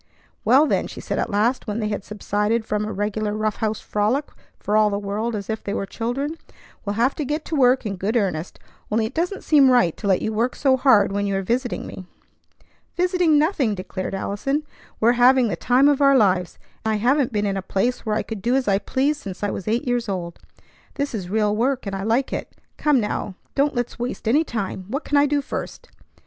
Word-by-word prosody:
"Well, 265 Hz, +7 st, +5 dB
then," -, -, 0 dB
she -, -, -9 dB
said -, -, -3 dB
at -, -, -1 dB
last, 225 Hz, +6 st, +1 dB
when 210 Hz, 0 st, -2 dB
they 215 Hz, -2 st, -1 dB
had 205 Hz, -2 st, -3 dB
subsided 210 Hz, +2 st, -1 dB
from 210 Hz, -1 st, -1 dB
a 215 Hz, -, -4 dB
regular 210 Hz, +1 st, -2 dB
rough 215 Hz, -1 st, -1 dB
house 220 Hz, -1 st, -1 dB
frolic 220 Hz, +8 st, -1 dB, 0.3 s
for 210 Hz, -, -1 dB
all 215 Hz, -1 st, +5 dB
the 200 Hz, -, -1 dB
world 210 Hz, +3 st, -2 dB
as 200 Hz, -2 st, -5 dB
if 220 Hz, -1 st, -4 dB
they 200 Hz, -, -3 dB
were -, -, -2 dB
children, 265 Hz, +10 st, -3 dB, 0.5 s
"we'll 205 Hz, 0 st, -3 dB
have 240 Hz, +5 st, +2 dB
to 305 Hz, -, -1 dB
get 300 Hz, +3 st, -3 dB
to 320 Hz, -, -3 dB
work 255 Hz, -2 st, +4 dB
in 200 Hz, -2 st, -3 dB
good 210 Hz, +6 st, 0 dB
earnest; 180 Hz, -6 st, -2 dB, 0.3 s
only 220 Hz, +1 st, +1 dB
it 225 Hz, -, -5 dB
doesn't 355 Hz, +6 st, -2 dB
seem 285 Hz, -4 st, +5 dB
right 240 Hz, -10 st, +3 dB
to 205 Hz, -, -4 dB
let 190 Hz, -2 st, +2 dB
you 220 Hz, -, -1 dB
work 235 Hz, +4 st, 0 dB
so 270 Hz, -2 st, +3 dB
hard 235 Hz, -7 st, +4 dB
when 200 Hz, 0 st, -1 dB
you 200 Hz, -, -1 dB
are 195 Hz, -, -1 dB
visiting 245 Hz, +5 st, -1 dB
me." 185 Hz, -, -9 dB, 0.9 s
"Visiting, 360 Hz, -3 st, +3 dB
nothing!" 290 Hz, -, +1 dB
declared 185 Hz, +1 st, -5 dB
Allison; 275 Hz, +10 st, -2 dB, 0.4 s
"we're 230 Hz, +2 st, +5 dB
having 250 Hz, -1 st, +6 dB
the 180 Hz, -, -1 dB
time 250 Hz, +9 st, +3 dB
of 290 Hz, -1 st, +3 dB
our 275 Hz, -1 st, +6 dB
lives. 185 Hz, -6 st, +2 dB, 0.3 s
I 220 Hz, 0 st, +1 dB
haven't 255 Hz, +5 st, +2 dB
been 210 Hz, -2 st, 0 dB
in 200 Hz, -1 st, 0 dB
a 195 Hz, -, -2 dB
place 195 Hz, +6 st, -1 dB
where 215 Hz, -2 st, -1 dB
I -, -, 0 dB
could 220 Hz, -3 st, -6 dB
do 240 Hz, +4 st, +1 dB
as 265 Hz, -3 st, 0 dB
I 195 Hz, -1 st, +3 dB
pleased 285 Hz, +6 st, 0 dB
since 195 Hz, 0 st, -7 dB
I 205 Hz, -, 0 dB
was 190 Hz, -, -6 dB
eight 230 Hz, +4 st, 0 dB
years 240 Hz, -2 st, 0 dB
old. 175 Hz, -3 st, -4 dB, 0.6 s
This 285 Hz, -1 st, -2 dB
is 190 Hz, -5 st, -4 dB
real 210 Hz, 0 st, +1 dB
work, 255 Hz, +3 st, 0 dB
and 195 Hz, -1 st, -3 dB
I 195 Hz, -, -4 dB
like 230 Hz, +6 st, 0 dB
it. -, -, -5 dB, 0.2 s
Come 295 Hz, -3 st, +2 dB
now, 210 Hz, -2 st, -3 dB, 0.2 s
don't 280 Hz, 0 st, +1 dB
let's 240 Hz, 0 st, -3 dB
waste 245 Hz, -1 st, -4 dB
any 285 Hz, +8 st, +4 dB
time. 200 Hz, -, -4 dB
What 275 Hz, +8 st, -3 dB
can 290 Hz, -, -1 dB
I 285 Hz, 0 st, +5 dB
do 285 Hz, 0 st, 0 dB
first? -, -, -6 dB
220 Hz, 230 wpm, -22 LUFS, 205-265 Hz, 0.9 s, having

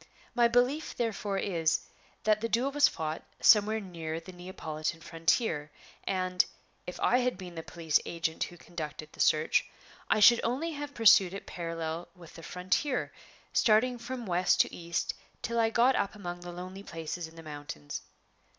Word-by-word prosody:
My 240 Hz, -1 st, +5 dB
belief 250 Hz, +6 st, +1 dB
therefore 215 Hz, -4 st, -1 dB
is, 165 Hz, -5 st, +1 dB, 0.4 s
that 215 Hz, 0 st, +3 dB
the 230 Hz, -, -1 dB
duel 250 Hz, +5 st, +1 dB
was 290 Hz, 0 st, +5 dB
fought 160 Hz, -1 st, -3 dB, 0.2 s
somewhere 215 Hz, 0 st, +5 dB
near 165 Hz, -5 st, -5 dB
the 185 Hz, -, -11 dB
Neapolitan 170 Hz, -3 st, -5 dB
frontier; 165 Hz, -1 st, 0 dB, 0.4 s
and, 185 Hz, -1 st, +2 dB, 0.4 s
if 180 Hz, -, -6 dB
I 250 Hz, -, +4 dB
had 250 Hz, -4 st, 0 dB
been 180 Hz, -2 st, -8 dB
the 165 Hz, -, -5 dB
police 160 Hz, -2 st, +1 dB
agent 160 Hz, -1 st, -2 dB
who 175 Hz, -, -12 dB
conducted 155 Hz, -3 st, -7 dB
the -, -, -16 dB
search, 155 Hz, +1 st, +3 dB, 0.5 s
I -, -, +4 dB
should 235 Hz, +3 st, +8 dB
only 270 Hz, +8 st, -1 dB
have 290 Hz, -1 st, -6 dB
pursued 195 Hz, -4 st, +6 dB
it 200 Hz, -, -7 dB
parallel 165 Hz, -1 st, -4 dB
with 170 Hz, -3 st, -14 dB
the 165 Hz, -, -10 dB
frontier, 185 Hz, -, -1 dB, 0.4 s
starting 240 Hz, +3 st, +3 dB
from 245 Hz, 0 st, -5 dB
west 180 Hz, -1 st, +2 dB
to -, -, -1 dB
east 170 Hz, -1 st, -2 dB, 0.3 s
till 235 Hz, 0 st, -1 dB
I 225 Hz, -1 st, +4 dB
got 240 Hz, +4 st, +4 dB
up 200 Hz, -, -1 dB
among 175 Hz, -4 st, -6 dB
the 175 Hz, 0 st, -8 dB
lonely 185 Hz, +2 st, -7 dB
places 165 Hz, -2 st, -5 dB
in 160 Hz, -, -16 dB
the 165 Hz, -, -10 dB
mountains. 145 Hz, -, -7 dB
185 Hz, 170 wpm, -30 LUFS, 165-230 Hz, 0.5 s, should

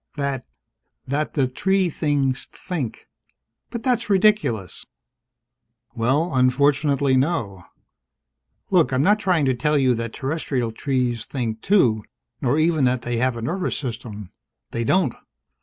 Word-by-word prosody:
"That 140 Hz, -4 st, -3 dB, 0.6 s
that 145 Hz, +3 st, -2 dB
the 135 Hz, -4 st, +2 dB
tree 190 Hz, +8 st, +1 dB
things 145 Hz, -5 st, 0 dB
think!" 145 Hz, -11 st, -5 dB, 0.6 s
"But 235 Hz, -1 st, -6 dB
that's 245 Hz, -4 st, 0 dB
ridiculous!" 195 Hz, -, +2 dB, 1.1 s
"Well, 135 Hz, +9 st, +1 dB
unfortunately, 135 Hz, +2 st, +3 dB
no. 125 Hz, -, -1 dB, 1.1 s
Look, 175 Hz, -7 st, +4 dB
I'm 130 Hz, +1 st, +2 dB
not 205 Hz, +5 st, +4 dB
trying 180 Hz, -8 st, +2 dB
to 130 Hz, -, +2 dB
tell 150 Hz, +5 st, +1 dB
you 130 Hz, -2 st, +3 dB
that 115 Hz, -1 st, -3 dB
terrestrial 135 Hz, -4 st, -2 dB
trees 125 Hz, -2 st, -1 dB
think, 115 Hz, -5 st, -4 dB
too, 120 Hz, -, +3 dB, 0.4 s
nor 130 Hz, +3 st, +1 dB
even 155 Hz, -2 st, +2 dB
that 125 Hz, -1 st, +1 dB
they 120 Hz, -1 st, -2 dB
have 125 Hz, 0 st, +1 dB
a 115 Hz, -, -6 dB
nervous 180 Hz, +9 st, -2 dB
system. 110 Hz, -7 st, -6 dB, 0.4 s
They 115 Hz, -, -2 dB
don't. 165 Hz, +1 st, +2 dB
135 Hz, 130 wpm, -22 LUFS, 120-160 Hz, 1.1 s, Look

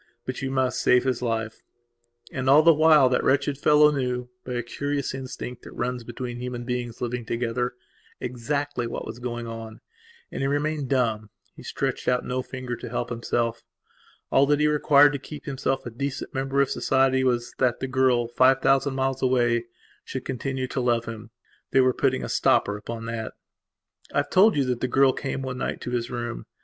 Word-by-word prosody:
But 130 Hz, -, -4 dB
you 130 Hz, -, -2 dB
must 130 Hz, -1 st, 0 dB
save 125 Hz, -, +4 dB
his 130 Hz, -2 st, -1 dB
life." 115 Hz, -2 st, -2 dB, 0.7 s
And, 130 Hz, -2 st, -1 dB
all 145 Hz, +3 st, +7 dB
the 165 Hz, 0 st, +7 dB
while, 155 Hz, -3 st, +6 dB
that 125 Hz, -, +1 dB
wretched 140 Hz, +1 st, +2 dB
fellow 150 Hz, +1 st, +5 dB
knewby 125 Hz, -2 st, -4 dB
a 120 Hz, -, -2 dB
curious 140 Hz, +3 st, -3 dB
instinct 130 Hz, -2 st, -6 dB
that -, -, -11 dB
runs 125 Hz, 0 st, -3 dB
between 120 Hz, +1 st, -6 dB
human 125 Hz, 0 st, -5 dB
beings 120 Hz, -2 st, -4 dB
living 125 Hz, 0 st, -2 dB
togetherexactly 125 Hz, +3 st, -4 dB
what -, -, -5 dB
was 115 Hz, -, -7 dB
going 120 Hz, -1 st, -4 dB
on. 115 Hz, -1 st, -8 dB, 0.5 s
And -, -, -4 dB
he 135 Hz, -, +1 dB
remained 145 Hz, -1 st, -1 dB
dumb; 115 Hz, -5 st, 0 dB, 0.3 s
he -, -, -12 dB
stretched -, -, -3 dB
out 125 Hz, 0 st, +1 dB
no 125 Hz, +1 st, -1 dB
finger 130 Hz, -1 st, -5 dB
to 120 Hz, -, -8 dB
help 120 Hz, 0 st, -3 dB
himself. 115 Hz, 0 st, -1 dB, 0.7 s
All 140 Hz, +1 st, +4 dB
that 145 Hz, 0 st, +3 dB
he 150 Hz, -, +3 dB
required 145 Hz, -1 st, +5 dB
to 140 Hz, -, -3 dB
keep 150 Hz, +2 st, -10 dB
himself 135 Hz, -1 st, -2 dB
a 120 Hz, -, -5 dB
decent 140 Hz, +4 st, -4 dB
member 135 Hz, +1 st, 0 dB
of 140 Hz, -, +1 dB
society 130 Hz, 0 st, +2 dB
was, 120 Hz, -1 st, 0 dB
that 125 Hz, -3 st, +2 dB
the -, -, -2 dB
girl, 130 Hz, -2 st, +2 dB
five 130 Hz, +3 st, +4 dB
thousand 135 Hz, +1 st, +2 dB
miles 135 Hz, 0 st, -1 dB
away, 120 Hz, -2 st, +2 dB, 0.4 s
should 130 Hz, -, -6 dB
continue 130 Hz, 0 st, -3 dB
to 135 Hz, -, -2 dB
love 120 Hz, -1 st, +1 dB
him. 115 Hz, 0 st, -8 dB, 0.4 s
They 135 Hz, -, +3 dB
were 130 Hz, -1 st, +4 dB
putting 65 Hz, -, 0 dB
a -, -, -3 dB
stopper 100 Hz, -, +2 dB
upon 115 Hz, +2 st, -6 dB
that. 115 Hz, -1 st, -4 dB, 0.8 s
I -, -, -3 dB
have -, -, 0 dB
told 205 Hz, +3 st, +6 dB
you 140 Hz, -, +2 dB
that 125 Hz, -2 st, -2 dB
the 130 Hz, -, +1 dB
girl 135 Hz, 0 st, +4 dB
came 135 Hz, -1 st, -4 dB
one 130 Hz, -1 st, -4 dB
night -, -, -3 dB
to 125 Hz, -, -5 dB
his 120 Hz, -1 st, -2 dB
room. 120 Hz, -1 st, -5 dB
125 Hz, 190 wpm, -25 LUFS, 120-135 Hz, 0.8 s, all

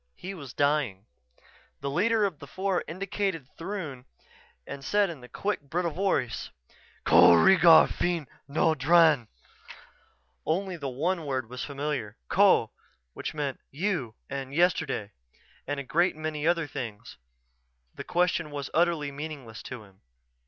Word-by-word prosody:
He 190 Hz, +2 st, -7 dB
was 140 Hz, -9 st, -9 dB
dying. 140 Hz, -10 st, 0 dB, 0.8 s
The 140 Hz, -, -2 dB
leader 215 Hz, +7 st, +2 dB
of 180 Hz, -8 st, -3 dB
the 140 Hz, -, -10 dB
four 190 Hz, +2 st, -1 dB
indicated 185 Hz, -3 st, -3 dB
Throon 165 Hz, -9 st, -6 dB, 0.6 s
and 140 Hz, -, -8 dB
said 205 Hz, +3 st, +2 dB
in 140 Hz, -7 st, -11 dB
a 125 Hz, -, -12 dB
quick, 205 Hz, -5 st, -2 dB
brittle 170 Hz, +1 st, 0 dB
voice: 160 Hz, -9 st, -1 dB, 0.5 s
"Ko -, -, +7 dB
reegar 170 Hz, -, +7 dB
feen 175 Hz, -3 st, -1 dB, 0.2 s
no 160 Hz, +3 st, +2 dB
dran!" 155 Hz, -3 st, +4 dB, 1.2 s
Only 185 Hz, +3 st, -1 dB
one 155 Hz, +6 st, -1 dB
word 130 Hz, -4 st, -2 dB
was 125 Hz, -, -5 dB
familiar: 140 Hz, -7 st, -4 dB
Ko, -, -, +4 dB, 0.4 s
which -, -, -5 dB
meant 145 Hz, -3 st, -3 dB
"you" 145 Hz, -, -2 dB
and 135 Hz, 0 st, -5 dB
"yesterday" 165 Hz, -, +1 dB, 0.6 s
and 145 Hz, 0 st, -2 dB
a -, -, -4 dB
great 170 Hz, +7 st, +1 dB
many 155 Hz, -1 st, -3 dB
other 170 Hz, -2 st, +2 dB
things. 120 Hz, -8 st, -7 dB, 0.8 s
The -, -, -7 dB
question 175 Hz, -2 st, 0 dB
was 145 Hz, -2 st, -6 dB
utterly 165 Hz, -4 st, +1 dB
meaningless 140 Hz, -6 st, -7 dB
to 125 Hz, -4 st, -8 dB
him. 95 Hz, -2 st, -21 dB
150 Hz, 135 wpm, -28 LUFS, 135-175 Hz, 1.2 s, Ko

